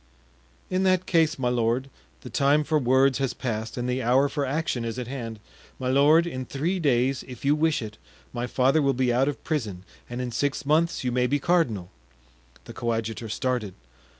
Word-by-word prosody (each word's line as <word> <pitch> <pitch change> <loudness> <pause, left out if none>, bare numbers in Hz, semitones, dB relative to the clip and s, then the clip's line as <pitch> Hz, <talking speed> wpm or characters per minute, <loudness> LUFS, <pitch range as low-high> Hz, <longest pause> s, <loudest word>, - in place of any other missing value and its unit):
"In 185 0 +1
that 185 -1 +2
case, 165 -2 +2
my 125 -2 0
lord, 120 +2 0 0.3
the - - -9
time 145 +2 +3
for 155 +1 +1
words 130 +1 +3
has 135 -3 -1
passed 110 -2 -4
and 120 0 -2
the 125 +1 -1
hour 130 +4 +3
for 140 0 -2
action 135 -4 -1
is 115 +1 -4
at 125 - -3
hand; 115 -4 -6 0.4
my 130 -1 -2
lord, 145 +5 +5
in 130 -7 -4
three 160 +9 -2
days, 135 -3 +1
if 125 0 -9
you 145 - +4
wish 155 -3 +1
it, 105 0 -9 0.3
my 120 0 -3
father 135 +5 +2
will 140 -1 +2
be 125 -1 +1
out 130 +3 +2
of 145 - -3
prison 110 - -3 0.3
and 120 +1 -5
in 125 -1 -3
six 140 +4 -1
months 160 +3 +2
you 125 - 0
may 125 0 +1
be 145 - +1
cardinal." 135 - 0 0.7
The - - -9
coadjutor 115 -1 -3
started. 120 -4 -2
130 Hz, 195 wpm, -25 LUFS, 120-145 Hz, 0.7 s, lord